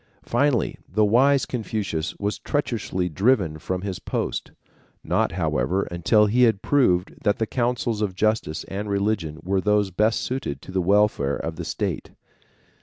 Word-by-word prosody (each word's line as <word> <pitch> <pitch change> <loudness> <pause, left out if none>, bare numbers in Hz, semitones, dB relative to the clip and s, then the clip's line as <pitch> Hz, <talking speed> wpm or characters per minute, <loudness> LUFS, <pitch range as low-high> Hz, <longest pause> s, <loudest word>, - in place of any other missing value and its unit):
Finally 130 0 +1
the 105 +3 +3
wise 130 +5 +4
Confucius 105 -9 -3
was 105 +1 -2
treacherously 115 -10 -2
driven 95 - +1
from 90 +3 -3
his 95 -3 -4
post, - - -3 0.5
not, - - 0
however, 90 +11 0
until 95 +5 +3
he 115 +4 +2
had 110 -5 +3
proved 95 -11 +2
that 105 -1 +2
the 110 - 0
counsels 120 -2 -1
of 100 -3 -1
justice 110 -6 0
and 100 +2 -5
religion 100 -6 -1
were 95 +1 0
those 105 -1 +2
best 105 +5 +1
suited 125 - -3
to 85 - -11
the 95 0 0
welfare 100 -7 +2
of 80 - -4
the 85 - -5
state. - - -3
105 Hz, 155 wpm, -24 LUFS, 90-115 Hz, 0.5 s, wise